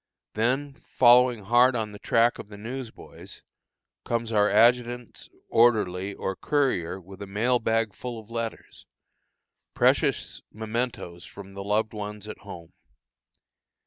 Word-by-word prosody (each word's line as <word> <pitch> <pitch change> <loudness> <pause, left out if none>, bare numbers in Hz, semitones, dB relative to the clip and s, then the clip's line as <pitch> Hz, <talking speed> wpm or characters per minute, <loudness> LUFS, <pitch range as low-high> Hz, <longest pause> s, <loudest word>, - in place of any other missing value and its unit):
Then, 130 +6 0 0.2
following 125 -2 +5
hard 120 +5 +4
on 110 -2 -2
the 105 - -11
track 115 +1 +2
of - - -9
the 105 - -10
news 120 +3 -6
boys, - - -13 0.6
comes 115 -1 -2
our 105 -1 +3
adjutant's 120 +2 +2 0.2
orderly 100 -5 +2
or 95 - -3
courier 125 - 0
with 95 +2 -13
a 100 - -6
mail 115 +5 +1
bag 115 -2 0
full 120 -2 -6
of 110 +1 -15
letters, 115 -1 -6 0.9
precious - - +1
mementos 110 -6 -4
from 100 -1 -11
the 100 0 -7
loved 105 +2 0
ones 105 0 -6
at - - -8
home. 85 -4 -11
110 Hz, 135 wpm, -26 LUFS, 100-120 Hz, 0.9 s, following